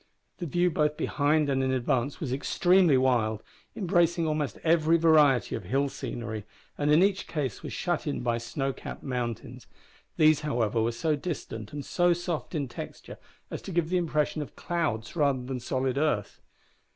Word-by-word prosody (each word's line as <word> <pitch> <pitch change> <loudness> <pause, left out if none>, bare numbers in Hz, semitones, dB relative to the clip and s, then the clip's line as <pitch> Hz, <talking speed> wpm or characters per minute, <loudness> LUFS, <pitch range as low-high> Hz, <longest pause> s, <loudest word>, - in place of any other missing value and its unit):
The 175 - -3
view 175 +3 +2
both 150 -1 +1
behind 150 +1 +1
and 135 -1 +1
in 130 - +1
advance 130 +1 0
was 130 -6 -3
extremely 175 +3 +3
wild, 115 -5 +1 0.3
embracing 175 -3 +2
almost 150 -3 -1
every 165 0 +4
variety 155 -6 +4
of - - -4
hill 135 +8 +1
scenery, 115 -5 -5 0.3
and 145 0 0
in 155 +4 +6
each 200 0 +1
case 140 -9 -3
was - - -6
shut 175 -3 -2
in 145 - -2
by 120 -1 0
snow 135 +4 -3
capped - - -8
mountains. 125 -4 -4 0.5
These, 155 -1 +5
however, 120 -7 0
were 115 +1 +1
so 155 +6 0
distant 140 - -5
and 145 -1 -6
so 175 -1 +3
soft 175 -1 -4
in 145 -3 -1
texture - - -9 0.3
as - - -5
to - - -7
give 170 -2 0
the 180 - +2
impression 155 -3 0
of 145 - -8
clouds 160 -11 -2
rather 140 -5 +1
than 130 0 -4
solid 130 +2 -1
earth. 145 -10 -1
145 Hz, 175 wpm, -28 LUFS, 125-165 Hz, 0.5 s, in